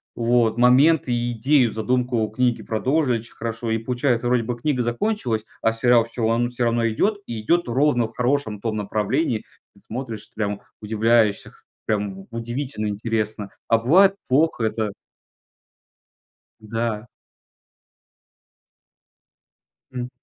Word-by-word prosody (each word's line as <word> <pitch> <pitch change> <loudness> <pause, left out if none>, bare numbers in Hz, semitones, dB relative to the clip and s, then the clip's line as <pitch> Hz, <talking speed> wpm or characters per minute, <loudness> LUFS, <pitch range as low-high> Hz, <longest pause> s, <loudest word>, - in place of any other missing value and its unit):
Вот. 115 -1 +2
Моменты 130 +4 +4
и 120 0 -1
идею, 125 +1 +3
задумку 120 +1 0
книги 120 +2 0
продолжили 130 +2 +1
очень 115 - -14
хорошо. 115 0 -4
И 110 - +1
получается, 120 +1 0
вроде 125 -1 +2
бы 120 +1 -3
книга 130 0 0
закончилась, 120 - -1 0.2
а 115 - +2
сериал 120 0 +4
всё 115 -1 -2
ан 120 +1 +1
всё 125 0 -3
равно 115 0 +1
идет 200 - +1
и 115 -2 -4
идет 170 +9 +1
ровно 125 0 +2
в 110 - -19
хорошем 125 -4 0
том 110 -1 -2
направлении. 110 +4 -1 0.4
Смотришь, 115 -3 -6
прям 105 -2 -3 0.2
удивляешься, 110 0 +1 0.3
прям 100 -3 -2
удивительно 120 0 -4
интересно, 105 0 -2 0.2
а 115 - +4
бывает 185 - +5
плохо 140 -1 +2
это 110 -2 -1 1.7
Да. 115 0 -3 2.8
Мгм. 125 -1 -4
115 Hz, 120 wpm, -22 LUFS, 110-125 Hz, 2.8 s, бывает